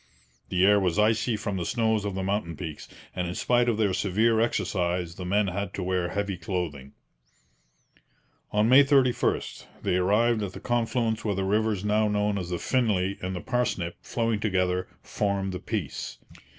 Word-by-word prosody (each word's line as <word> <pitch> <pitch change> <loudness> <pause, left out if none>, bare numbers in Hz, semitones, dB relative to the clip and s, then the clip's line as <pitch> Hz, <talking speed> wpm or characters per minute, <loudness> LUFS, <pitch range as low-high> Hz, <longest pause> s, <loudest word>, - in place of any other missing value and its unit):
The 90 +1 +3
air 105 +1 +6
was 90 -2 0
icy 110 +2 +2
from 105 -2 -3
the 90 - -2
snows 110 +2 0
of 100 -2 -3
the 95 - -2
mountain 95 -5 -2
peaks, 80 -4 -7 0.3
and 90 -1 -1
in 90 - -4
spite 120 0 +2
of 115 - 0
their 105 -4 +2
severe 110 +5 +2
exercise 90 -6 0
the 90 +1 -7
men 100 +1 +2
had 100 +2 -4
to 95 - -3
wear 90 -1 0
heavy 100 -2 -2
clothing. 85 -6 -4 1.6
On 105 +1 +3
May 130 +4 +8
31 135 -3 +3 0.4
they 90 - +1
arrived 110 +5 +2
at 100 -3 -4
the - - -8
confluence 115 -2 0
where 105 -3 0
the 95 - -1
rivers 105 0 0
now 105 +1 +2
known 105 -1 0
as 90 -2 -5
the 90 - -1
Finlay 100 -5 0
and 95 +1 -3
the 90 - -4
Parsnip, 120 -9 -1
flowing 115 -2 -1
together, 90 -3 0 0.2
form 100 -2 -1
the 90 - -5
Peace. 100 - -4
100 Hz, 175 wpm, -27 LUFS, 90-110 Hz, 1.6 s, May